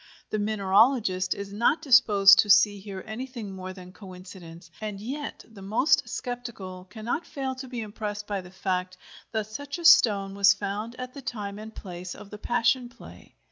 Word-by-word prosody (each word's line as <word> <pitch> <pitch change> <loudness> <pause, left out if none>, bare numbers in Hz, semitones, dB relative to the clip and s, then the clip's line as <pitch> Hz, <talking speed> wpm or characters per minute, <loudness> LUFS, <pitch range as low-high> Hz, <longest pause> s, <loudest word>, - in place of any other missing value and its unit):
The 215 - -1
mineralogist 205 -1 +2
is 200 0 -7
not 260 +10 +2
disposed 205 -8 +7
to 210 - +4
see 205 0 +5
here 195 -1 -8
anything 230 -1 -6
more 185 -1 -7
than 180 -1 -11
coincidence, 180 -3 -12
and 210 -2 -5
yet 275 +7 -6
the 220 -3 -14
most 215 +9 +2
sceptical 215 -7 -6
cannot 235 - -3
fail 270 -4 -4
to 260 0 -8
be 245 -2 -5
impressed 210 -1 -5
by 200 -2 -3
the 180 - -13
fact 185 -1 -3 0.3
that 220 -2 -1
such 280 +8 -6
a 340 - -7
stone 200 -9 +6
was 200 +1 +5
found 205 +4 -4
at 255 0 -7
the 280 - -9
time 205 -5 -5
and 220 +1 -10
place 180 -1 -8
of 205 -1 -12
the 210 - -9
Passion 240 +2 +1
Play. 245 - -15
210 Hz, 180 wpm, -26 LUFS, 195-240 Hz, 0.3 s, disposed